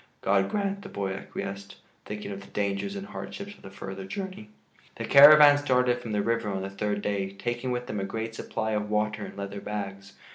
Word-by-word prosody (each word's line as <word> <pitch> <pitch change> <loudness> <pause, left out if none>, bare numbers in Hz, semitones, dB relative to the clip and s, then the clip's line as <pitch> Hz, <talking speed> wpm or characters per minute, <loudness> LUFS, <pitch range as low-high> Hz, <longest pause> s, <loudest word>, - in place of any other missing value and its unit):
"God 95 0 +2
grant," 200 -1 -1
the - - -9
boy 95 -1 -3
acquiesced, 100 0 -6 0.3
thinking 105 -1 -6
of 100 0 -6
the 100 - -13
dangers 100 - -2
and 195 0 -5
hardships 200 0 -7
of - - -20
the - - -10
further 95 0 -7
journey. 185 - -6 0.5
The - - -4
caravan 145 0 +9
started 125 -3 +2
from 115 -2 -7
the 105 -1 +1
river 115 -1 0
on 95 -1 -2
the 95 - -5
third 105 +1 -2
day, 100 -1 -1
taking 120 +5 -3
with 125 0 -2
them 110 -5 -4
a - - -2
great 115 +3 -4
supply 110 -1 -3
of 105 -1 -1
water 105 0 0
in - - -12
leather 100 0 -5
bags. 100 -1 -5
105 Hz, 210 wpm, -27 LUFS, 100-125 Hz, 0.5 s, caravan